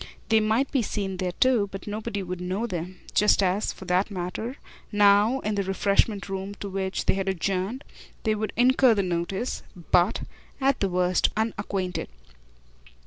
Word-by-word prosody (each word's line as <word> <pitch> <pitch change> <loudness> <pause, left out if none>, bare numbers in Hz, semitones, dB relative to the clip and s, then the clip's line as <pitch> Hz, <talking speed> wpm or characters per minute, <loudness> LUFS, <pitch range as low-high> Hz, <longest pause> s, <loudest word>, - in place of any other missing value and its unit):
They 220 -1 +5
might 220 +5 +1
be 270 - +2
seen 195 -3 -3
there 180 -1 -2
too, 235 -3 +3
but 195 - -7
nobody 205 -1 -4
would 180 0 -5
know 185 +5 -2
them; 180 -3 -5
just 210 -1 +4
as, 190 +3 +1
for 190 - -11
that 180 +3 +1
matter, 200 +6 -4 0.4
now, 205 +4 +4
in 215 - -1
the 200 - 0
refreshment 200 +2 +1
room 195 +1 -4
to 200 - -6
which 190 0 -2
they - - +3
had 195 0 -1
adjourned, 190 - -2 0.4
they 220 - +2
would 215 0 -2
incur 250 0 +5
the 200 - +1
notice 185 +6 -2 0.3
but, 180 +4 +4 0.4
at 270 -1 +2
the 195 - +1
worst, 180 0 +2
of - - -10
the 220 - +2
unacquainted. 200 - -3
200 Hz, 175 wpm, -26 LUFS, 185-220 Hz, 0.4 s, They